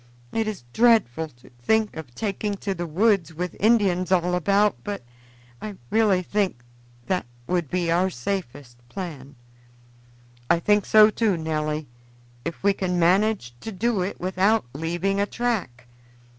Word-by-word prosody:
It 225 -1 -1
is 210 - -4
dreadful 220 - +3
to 120 -5 -20
think 220 - +1
of 135 -7 -9
taking 205 - -2
to 195 0 -3
the 175 -2 -4
woods 185 -1 +2
with 180 +2 -4
Indians 195 -5 +3
all 180 -1 +2
about, 200 +4 +2
but 205 - -5 0.6
I 210 -2 -6 0.2
really 205 -5 +3
think 190 -10 -1 0.4
that 180 -9 -1 0.2
would 170 0 -1
be 175 -2 0
our 180 +3 +3
safest 140 -5 -5
plan." 145 -7 -7 1.1
"I 170 - +4
think 205 +3 +2
so 215 0 +7
too, 210 -5 +1
Nelly, 155 -1 -2 0.6
if 170 - -6
we 200 0 +4
can 180 -2 -2
manage 180 - +2
to 225 - -6
do 220 +1 0
it 185 +2 -3
without 190 - +2
leaving 175 +6 -1
a 205 - +1
track. 205 - -2
185 Hz, 145 wpm, -24 LUFS, 160-210 Hz, 1.1 s, so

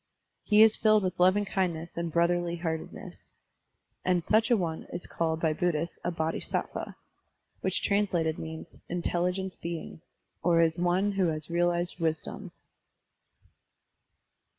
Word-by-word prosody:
He 210 0 +6
is 220 -1 +5
filled 215 -2 +4
with 185 -1 -2
loving 185 +3 +4
kindness 175 -4 -2
and 170 -1 -3
brotherly 170 +1 +1
heartedness. 165 -2 -6 0.7
And 180 -2 +2
such 220 +6 +3
a 240 - +5
one 165 -4 -3
is 175 - -5
called 160 -1 -1
by 160 -2 +1
Buddhists 170 0 -1
a - - 0
Bodhisattva, 160 -1 -3 0.6
which - - -1
translated 180 -6 +1
means 160 0 -8
" - - -42
intelligence 180 +2 -1
being,'* 165 -1 -6 0.4
or 165 -1 +4
"one 180 +3 +2
who 195 -2 +1
has 155 0 -3
realized 175 +1 0
wisdom." 160 -2 -2
175 Hz, 125 wpm, -29 LUFS, 165-185 Hz, 0.7 s, He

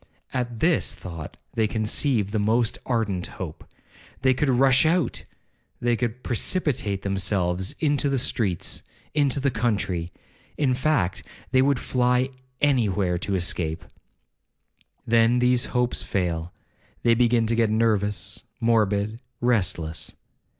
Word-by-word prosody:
At 120 -3 -3
this 170 0 +2
thought 80 -4 -8 0.2
they 110 -1 +2
conceive 110 0 0
the 110 - 0
most 110 +2 +1
ardent 105 -7 0
hope,—they 130 0 -5
could 145 +2 0
rush 130 +1 +5
out,—they 155 -6 -2
could 120 +1 -3
precipitate 120 - 0
themselves 95 -1 0
into 145 -2 +2
the 135 - +1
streets, 110 -8 -1 0.3
into 145 -2 +2
the 140 0 +1
country,—in 105 - -2
fact, 125 - 0 0.3
they 130 0 +5
would 140 0 +3
fly 125 +1 +1 0.3
any 130 -7 +3
where 90 -2 0
to 100 +1 -2
escape. 85 -2 -1 1.2
Then 115 +1 +4
these 125 0 +3
hopes 125 -1 0
fail,—they 90 +5 -2
begin 120 -1 +3
to 115 - 0
get 115 -1 +2
nervous, 105 -2 0 0.2
morbid, 110 -1 +1 0.2
restless. 85 -9 0
115 Hz, 115 wpm, -25 LUFS, 100-125 Hz, 1.2 s, rush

